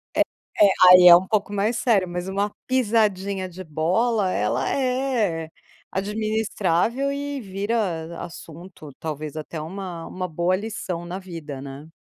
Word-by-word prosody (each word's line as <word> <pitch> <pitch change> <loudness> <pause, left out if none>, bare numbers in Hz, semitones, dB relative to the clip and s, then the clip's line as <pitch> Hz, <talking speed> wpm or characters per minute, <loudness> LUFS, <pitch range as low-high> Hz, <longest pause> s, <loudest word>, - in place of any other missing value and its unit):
É - - +3 0.4
é, 205 - +9 0.2
aí 180 0 +9
é 175 - +11
um 185 +2 +2
pouco 205 -1 0
mais 205 +3 0
sério, 210 -7 +2
mas 175 +1 -4
uma 200 +2 -1 0.2
pisadinha 205 -6 +1
de 185 +1 -9
bola 185 +7 +1
ela 105 - 0
é 250 - 0 0.4
administrável 215 +3 0
e 285 0 -4
vira 200 +2 -3 0.4
a - - -4
assunto 170 -1 -11
talvez 155 -1 -5
até 155 +1 -6
uma 175 +1 -6
uma 185 0 -4
boa 175 +2 0
lição 190 -4 -5
na 175 +2 -5
vida, 165 -7 -8
né. 140 +2 -9
190 Hz, 145 wpm, -23 LUFS, 170-215 Hz, 0.4 s, é